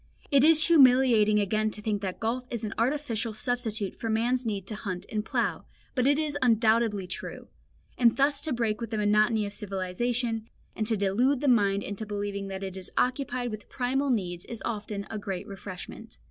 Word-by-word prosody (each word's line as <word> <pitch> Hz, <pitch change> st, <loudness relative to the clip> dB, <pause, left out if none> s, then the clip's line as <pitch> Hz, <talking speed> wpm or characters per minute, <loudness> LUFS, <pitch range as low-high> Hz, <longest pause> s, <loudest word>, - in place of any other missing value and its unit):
It 275 Hz, -2 st, +5 dB
is 315 Hz, 0 st, +6 dB
humiliating 250 Hz, -8 st, +5 dB
again 215 Hz, +1 st, +1 dB
to 210 Hz, -, -3 dB
think 210 Hz, -1 st, -2 dB
that 190 Hz, -2 st, -4 dB
golf 245 Hz, +3 st, -2 dB
is 235 Hz, -2 st, -3 dB
an 215 Hz, -, -3 dB
artificial 230 Hz, -3 st, -1 dB
substitute 225 Hz, -4 st, -2 dB
for 225 Hz, -, -4 dB
man's 240 Hz, +3 st, +1 dB
need 200 Hz, -3 st, -2 dB
to 215 Hz, -, -5 dB
hunt 185 Hz, -4 st, -5 dB
and 215 Hz, -1 st, -1 dB
plough, 220 Hz, -, -1 dB, 0.3 s
but 255 Hz, 0 st, +1 dB
it 285 Hz, 0 st, +4 dB
is 305 Hz, -2 st, -1 dB
undoubtedly 225 Hz, -4 st, +3 dB
true; 180 Hz, -, -7 dB, 0.5 s
and 235 Hz, -2 st, +4 dB
thus 280 Hz, +1 st, +3 dB
to 310 Hz, +1 st, -2 dB
break 230 Hz, -3 st, -1 dB
with 230 Hz, -, -4 dB
the 220 Hz, -, -2 dB
monotony 210 Hz, +1 st, +3 dB
of 200 Hz, -, -6 dB
civilisation, 220 Hz, +4 st, -2 dB, 0.3 s
and 215 Hz, -, -2 dB
to 220 Hz, -2 st, +1 dB
delude 235 Hz, +8 st, +2 dB
the 290 Hz, -, -1 dB
mind 200 Hz, -5 st, +3 dB
into 205 Hz, +2 st, -5 dB
believing 200 Hz, -1 st, -3 dB
that 195 Hz, 0 st, -5 dB
it 190 Hz, -1 st, -5 dB
is 185 Hz, -, -6 dB
occupied 250 Hz, -1 st, 0 dB
with 215 Hz, -1 st, -8 dB
primal 270 Hz, +2 st, 0 dB
needs 180 Hz, -7 st, -1 dB
is 235 Hz, -, -7 dB
often 210 Hz, -3 st, -4 dB
a 220 Hz, -, -3 dB
great 195 Hz, -2 st, -4 dB
refreshment. 195 Hz, -2 st, -9 dB
220 Hz, 190 wpm, -28 LUFS, 205-245 Hz, 0.5 s, is